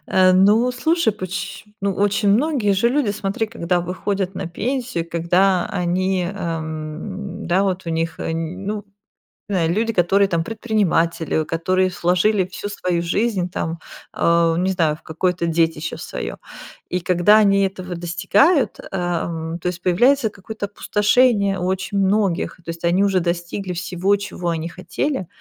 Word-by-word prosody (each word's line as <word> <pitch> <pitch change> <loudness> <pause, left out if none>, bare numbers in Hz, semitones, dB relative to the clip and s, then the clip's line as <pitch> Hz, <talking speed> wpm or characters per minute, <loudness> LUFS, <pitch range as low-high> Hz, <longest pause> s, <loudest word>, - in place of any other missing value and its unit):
Э, 185 0 +5
ну, 210 +6 +4
слушай 320 +1 +1
поч 190 -1 -5 0.2
ну, 200 -1 0
очень 205 +1 +1
многие 240 -2 +2
же 195 +5 +3
люди, 260 -3 +1
смотри, 205 +2 -2
когда 180 -5 -1
выходят 190 +2 -2
на 190 - -4
пенсию, 240 -1 -3
когда 180 +2 +2
они, 185 +1 0
эм, 165 +2 -5
да, 180 +3 +2
вот 190 -2 -2
у - - -2
них, 165 0 -2
э, - - -2
ну, 190 +6 -4 0.7
знаю. 170 -4 +1
Люди, 225 +4 0
которые 195 0 +3
там 170 -3 0
предприниматели, 170 -8 0
которые 185 +4 0
вложили 185 +3 +3
всю 205 +2 -6
свою 180 -4 -1
жизнь 185 +1 0
там, 165 -1 -3 0.3
а, 170 -1 +3
не 185 +2 +1
знаю, 165 -5 +1
в - - -20
какое-то 175 +2 -1
детище 165 -1 0
свое. - - -5 0.5
И 180 - -2
когда 180 +4 +5
они 200 -2 +4
этого 185 -2 -5
достигают, 180 - +2
ам, 170 -2 -2
то 175 - -4
есть 175 -1 -3
появляется 240 +7 +3
какое-то 205 +1 -6
опустошение 210 0 +2
очень 190 +2 -2
у - - +3
многих, 195 -3 +1
то 170 - -10
есть 165 +1 -5
они 180 +3 +3
уже 195 -2 +2
достигли 175 +2 -3
всего, 180 +3 0
чего 200 -3 -4
они 165 0 -2
хотели, 185 - -3
185 Hz, 150 wpm, -21 LUFS, 170-205 Hz, 0.7 s, Э